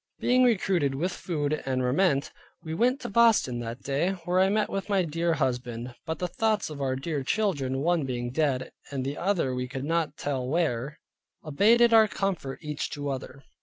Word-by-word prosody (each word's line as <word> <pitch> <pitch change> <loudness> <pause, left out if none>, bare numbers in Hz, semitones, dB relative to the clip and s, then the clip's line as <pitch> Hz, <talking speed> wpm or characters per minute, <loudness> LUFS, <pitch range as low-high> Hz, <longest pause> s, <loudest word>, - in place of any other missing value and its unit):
Being 250 +1 +3
recruited 190 - +2
with 175 +7 -1
food 155 -4 -2
and 130 -1 -1
raiment 140 +2 +2 0.3
we 160 -1 -5
went 250 - +2
to - - -4
Boston 210 - +4
that 120 +1 -6
day, 145 +7 0
where 180 +1 +2
I 190 +1 +4
met 210 +1 +1
with 195 +1 -4
my 195 -2 +3
dear 165 +1 0
husband, 125 -2 -2
but 160 0 -2
the 180 - -2
thoughts 215 -1 0
of 145 -2 -7
our 130 -1 0
dear 140 +2 -3
children, 135 -6 0
one 170 0 +2
being 120 -2 -3
dead, 130 -3 0 0.2
and 135 -2 -3
the 140 +2 -2
other 175 -8 0
we 125 0 -3
could 135 +1 -5
not 160 -2 -1
tell 135 -3 -2
where, 150 -2 -1 0.5
abated 230 +10 +4
our 220 -1 +7
comfort 190 -10 -3
each 150 -1 -3
to 145 -1 -4
other. 135 0 -6
150 Hz, 190 wpm, -27 LUFS, 135-190 Hz, 0.5 s, our